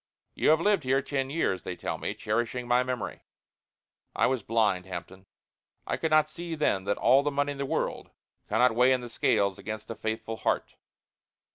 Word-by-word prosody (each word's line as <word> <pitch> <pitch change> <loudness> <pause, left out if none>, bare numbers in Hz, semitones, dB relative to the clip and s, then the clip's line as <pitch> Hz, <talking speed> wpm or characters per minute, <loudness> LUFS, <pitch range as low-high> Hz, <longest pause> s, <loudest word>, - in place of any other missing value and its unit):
You - - +2
have 155 0 +5
lived 200 -2 +2
here 135 +1 +2
ten 135 -2 -2
years, 140 - 0
they 90 - -5
tell - - -4
me, - - -3
cherishing 120 +3 -2
my 120 +1 +4
memory! 125 -3 -4 0.9
I - - +3
was 130 -2 +1
blind, 105 -4 +1
Hampton. 95 +1 -8 0.6
I - - -1
could 160 - -1
not 155 -1 +4
see 170 +1 -6
then 100 -11 0
that 100 0 0
all 135 +2 +5
the 145 - 0
money 145 0 0
in 140 - -7
the 140 - -2
world - - -2 0.4
cannot 115 +3 +4
weigh 125 +3 +5
in 130 - 0
the 120 - -7
scales 100 -4 +1
against 110 +1 -6
a - - -5
faithful 110 +1 -4
heart. - - -1
125 Hz, 190 wpm, -28 LUFS, 110-140 Hz, 0.9 s, have